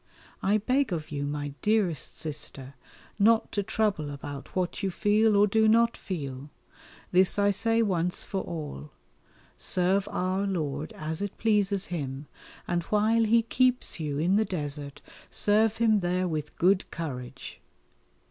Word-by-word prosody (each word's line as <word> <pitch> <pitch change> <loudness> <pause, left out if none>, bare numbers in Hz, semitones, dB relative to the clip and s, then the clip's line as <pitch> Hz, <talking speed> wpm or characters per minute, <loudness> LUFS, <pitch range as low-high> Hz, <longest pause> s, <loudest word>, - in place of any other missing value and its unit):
I 205 +2 +3
beg 255 +3 +1
of 155 -3 -4
you, 145 -1 -2
my 145 0 -3
dearest 210 -8 0
Sister, 145 -3 -4 0.5
not 225 +2 +4
to 205 - 0
trouble 200 -7 -1
about 140 -1 -8
what 185 +1 -1
you 195 - 0
feel 210 +3 +2
or 205 - +6
do 220 +2 +3
not 230 +1 +4
feel 140 -6 -6 0.6
this 185 +2 +4
I 205 0 +4
say 225 +3 +2
once 180 -3 -1
for 195 - -3
all. 145 - -6 0.7
Serve 185 +2 +2
Our 185 +2 -1
Lord 155 -5 -3
as 155 +2 -4
it 205 -1 -4
pleases 205 -3 +1
Him, 140 -3 -4 0.4
and 175 -1 0
while 220 +3 +2
He 230 +1 +4
keeps 250 -2 +1
you 150 -3 -2
in 175 +6 +2
the 220 - +3
desert 145 -6 -5 0.3
serve 215 +1 +3
Him 225 -2 +3
there 180 0 0
with 155 -3 -4
good 185 +2 +2
courage. 130 -7 -7
185 Hz, 150 wpm, -28 LUFS, 150-215 Hz, 0.7 s, or